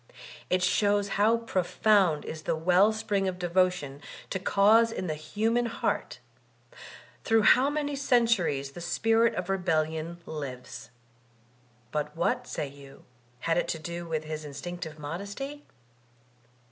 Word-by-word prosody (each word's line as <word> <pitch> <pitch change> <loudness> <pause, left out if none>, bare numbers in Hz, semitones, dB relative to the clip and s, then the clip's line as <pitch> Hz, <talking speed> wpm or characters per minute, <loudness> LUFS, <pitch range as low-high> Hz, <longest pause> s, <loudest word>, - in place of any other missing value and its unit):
It 185 0 +2
shows 205 +1 +2
how 215 +4 +3
profound 195 -5 +2
is 155 - -6
the - - -1
well 180 +6 +4
spring 205 -3 -1
of 185 -1 -2
devotion 180 -5 0 0.3
to 190 - -1
cause 215 +4 +4
in 190 - -4
the 160 - -1
human 225 +10 0
heart; 230 - -2 1.1
through 225 -2 +3
how 260 +7 +6
many 290 -1 -2
centuries 230 - +1
the 175 - -9
spirit 225 +6 +2
of 180 - -3
rebellion 165 -3 -1
lives. 130 -4 -7 1.0
But 150 +1 -3
what, 245 +8 0
say 145 - -3
you, 140 0 -14 0.4
had 165 +1 +1
it - - -1
to - - -2
do 170 +1 -6
with 160 -1 -2
his 155 0 -5
instinctive 155 +3 -7
modesty? 200 - -6
180 Hz, 135 wpm, -28 LUFS, 155-220 Hz, 1.1 s, how